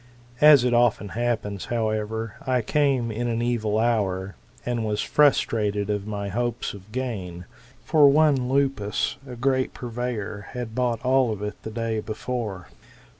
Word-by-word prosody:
As 150 -4 +8
it 125 -1 +1
often 120 -4 +2
happens, 110 -3 -2
however, 110 -1 -2
I 125 -2 +1
came 135 -2 +1
in 120 +3 -2
an 115 -1 -1
evil 115 -3 0
hour, 100 -5 0 0.3
and 120 -2 -1
was 105 -1 -1
frustrated 105 -8 +2
of 105 0 -3
my 100 -1 -3
hopes. 120 +3 -2
of 100 +1 -13
gain. 100 -9 -4 0.4
For 150 -3 +6
one 140 -4 +3
Lupus, 135 -7 0
a 125 - -6
great 130 +1 0
purveyor, 115 -4 -4
had 120 -3 -5
bought 120 -1 -1
all 130 -2 +3
of 105 -1 -5
it 105 0 -5
the - - -6
day 115 0 -2
before. 110 -3 -5
115 Hz, 150 wpm, -25 LUFS, 105-125 Hz, 0.4 s, As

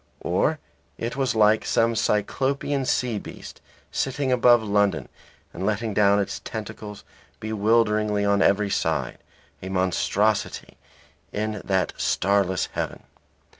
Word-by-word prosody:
Or 95 - +1 0.4
it 115 +1 -4
was 135 -4 0
like 110 0 +4
some 115 0 +2
cyclopean 135 +6 0
sea 120 -4 0
beast - - -11 0.3
sitting 135 0 -1
above 120 -2 +5
London 100 -5 +1 0.5
and - - -6
letting 110 +2 -1
down 100 0 +4
its 100 - -2
tentacles 105 -1 -7 0.4
bewilderingly 105 -1 +1
on 100 0 +2
every 100 +1 +2
side, 75 -9 -1 0.4
a 95 - -6
monstrosity 95 +3 0 0.6
in 105 0 -3
that 95 -2 0
starless 95 -2 +1
heaven. - - -4
105 Hz, 115 wpm, -24 LUFS, 100-115 Hz, 0.6 s, above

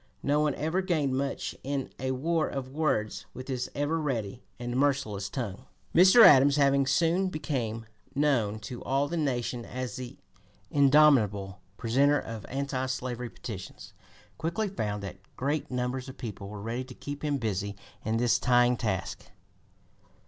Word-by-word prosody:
No 145 +1 +2
one 150 -2 +1
ever 160 +5 0
gained 155 -8 0
much 135 +1 -2
in 135 0 -3
a 130 - -2
war 155 +5 0
of 130 -1 -5
words 130 -9 -1
with 130 - -7
this 130 -2 -3
ever 145 +3 0
ready 120 -5 -3 0.2
and 120 0 -4
merciless 130 -8 0
tongue. 120 -1 -5 0.3
Mr. 185 +7 +8
Adams, 140 0 +7
having 140 -2 +3
soon 170 +7 +2
become 125 -9 -3 0.3
known 130 -8 +2
to 120 +3 -7
all 135 +2 +1
the 170 - -3
nation 125 -6 -1
as 130 +1 -5
the 130 +1 -7 0.5
indomitable 130 -10 +4 0.2
presenter 135 +5 +3
of 110 -2 -7
anti 135 -1 -2
slavery 125 -2 -3
petitions, 100 -8 -8 0.5
quickly 170 +7 -1
found 105 - -3
that 100 - -7 0.2
great 145 +3 -1
numbers 125 +1 -2
of 130 - -10
people 105 -5 -6
were 105 -1 -7
ready 115 +3 -3
to 125 -1 -11
keep 145 +1 -7
him 145 -2 +1
busy 100 -4 -2 0.3
in 110 +1 0
this 120 0 +3
trying 125 0 +4
task. 95 -6 -3
130 Hz, 155 wpm, -29 LUFS, 115-145 Hz, 0.5 s, Mr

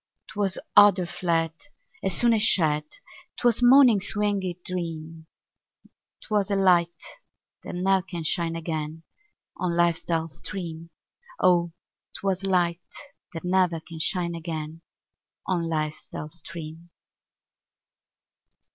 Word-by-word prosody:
'Twas 200 -2 -1 0.2
odor 205 -3 +7
fled 170 -2 -1 0.5
As 190 -2 -1
soon 240 -1 +4
as 220 - +2
shed; 155 -8 +4 0.5
'Twas 240 -1 +2
morning's 245 -5 +5
winged 205 -2 0 0.2
dream; 165 -2 -5 0.9
'Twas 205 -2 -1
a 200 - +1
light, 175 -3 +2 0.6
that - - -7
ne'er 190 +1 +2
can 175 -2 -6
shine 165 +1 0
again 160 -1 -4 0.5
On 175 -2 -1
life's 170 -1 +2
dull 165 -1 -1
stream: 165 0 -6 0.5
Oh! 175 -1 +3 0.5
'twas 195 -1 -2
light 180 -2 +1 0.5
that 165 - -6
ne'er 180 -2 +2
can 165 0 -11
shine 175 +1 0
again 160 -1 -6 0.6
On 170 -3 -1
life's 155 -1 -3
dull 150 - -7
stream. 165 0 -9
170 Hz, 110 wpm, -25 LUFS, 165-190 Hz, 0.9 s, odor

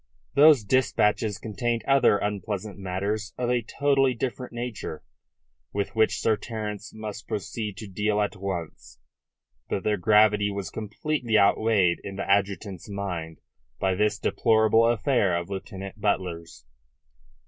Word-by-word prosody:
Those 145 -4 +7
dispatches 105 -3 +1
contained 115 +2 -2
other 135 -6 +5
unpleasant 105 0 -4
matters 100 +4 -3
of 125 -1 0
a 125 -1 +2
totally 135 +2 +1
different 125 +1 -4
nature, 120 -9 -5 0.7
with 100 +2 -2
which 110 0 +3
Sir 110 - +2
Terence 105 -3 -6
must 105 -1 -7
proceed 105 0 -4
to 110 - -7
deal 105 +2 0
at 105 0 0
once; 95 -5 -6 0.7
but 95 - -2
their 105 -1 +1
gravity 105 +1 +4
was 100 -1 -5
completely 110 +2 -1
outweighed 100 -3 +3
in 100 - -6
the 100 - -4
adjutant's 100 -1 0
mind 90 -5 -5 0.4
by 95 -1 +1
this 105 +2 +1
deplorable 110 +1 +3
affair 115 -5 +2
of 85 +3 -5
Lieutenant 95 +1 -7
Butler's. 85 - -2
105 Hz, 130 wpm, -26 LUFS, 100-115 Hz, 0.7 s, Those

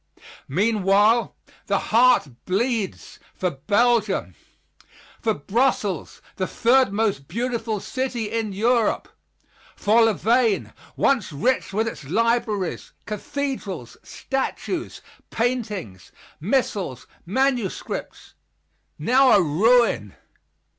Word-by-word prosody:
Meanwhile 210 - +2 0.3
the - - +2
heart 245 -5 +4 0.2
bleeds 215 +1 -2 0.2
for 180 -1 -1
Belgium. 205 - +1 0.9
For - - +1
Brussels, 205 - -1
the 185 - -1
third 255 -1 +3
most 200 -9 -1
beautiful 230 +1 -2
city 245 -2 -3
in 225 -2 -2
Europe! 225 +3 +1 0.7
For 225 +3 +4
Louvain, 225 0 +1 0.2
once 255 -11 +1
rich 245 - 0
with 220 +3 0
its 225 - -6
libraries, 215 - -1
cathedrals, 215 - -4
statues, 270 0 -4 0.3
paintings, 210 - -3 0.3
missals, 195 - -1 0.2
manuscripts 245 +2 -2 0.6
now 260 +2 +4
a 205 - +6
ruin. 190 - +2
220 Hz, 85 wpm, -23 LUFS, 190-245 Hz, 0.9 s, a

